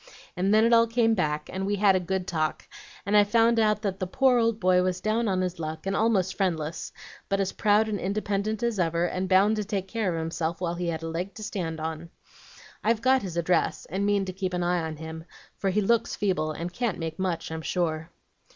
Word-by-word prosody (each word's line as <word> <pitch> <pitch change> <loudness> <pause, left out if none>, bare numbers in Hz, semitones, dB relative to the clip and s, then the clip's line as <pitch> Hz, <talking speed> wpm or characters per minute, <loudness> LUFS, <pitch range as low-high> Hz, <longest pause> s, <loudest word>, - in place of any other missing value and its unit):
And 190 +2 +1
then 215 +1 +5
it 235 - +4
all 230 0 +6
came 230 -1 +2
back, 150 -6 -1
and 190 +1 -3
we 205 +1 0
had 200 -1 +4
a - - +3
good 185 +1 -2
talk, 155 -4 -2 0.4
and 200 +2 +1
I 205 - +8
found 230 +2 +3
out 215 -1 +2
that 195 -2 -2
the 185 - -2
poor 255 +5 +3
old 230 -1 +1
boy 185 -2 +4
was 185 0 -1
down 220 +4 0
on 185 -2 +1
his 180 -1 -3
luck, 155 +1 -5
and 195 0 -1
almost 195 -5 +1
friendless, 165 -5 -2 0.4
but 195 0 +1
as 195 -1 0
proud 210 +1 +3
and 210 -2 -2
independent 205 +2 -2
as 235 -4 0
ever, 170 0 +1
and 185 +1 -3
bound 200 +3 +4
to 210 - -1
take 195 -2 -3
care 220 -3 -1
of 165 - -2
himself 165 +1 -3
while 175 -2 -1
he 175 0 -3
had 165 -1 -3
a - - -3
leg 175 +4 -4
to 215 - -8
stand 165 -6 -4
on. 160 +1 -5 0.7
I've 225 +1 +1
got 260 +1 +4
his 180 -4 -5
address, 170 +1 +1
and 195 +2 -1
mean 200 -1 +2
to 185 - -5
keep 185 -1 -3
an 175 - -1
eye 175 0 +1
on 160 -1 -4
him, 160 +1 -8 0.3
for 195 - -1
he 205 +3 +1
looks 230 +3 +1
feeble 180 -7 0
and 170 +3 -5
can't 235 -1 -1
make 165 +1 -5
much, 180 -4 -2
I'm 160 0 -4
sure.' 160 -1 -2
190 Hz, 235 wpm, -27 LUFS, 170-210 Hz, 0.7 s, I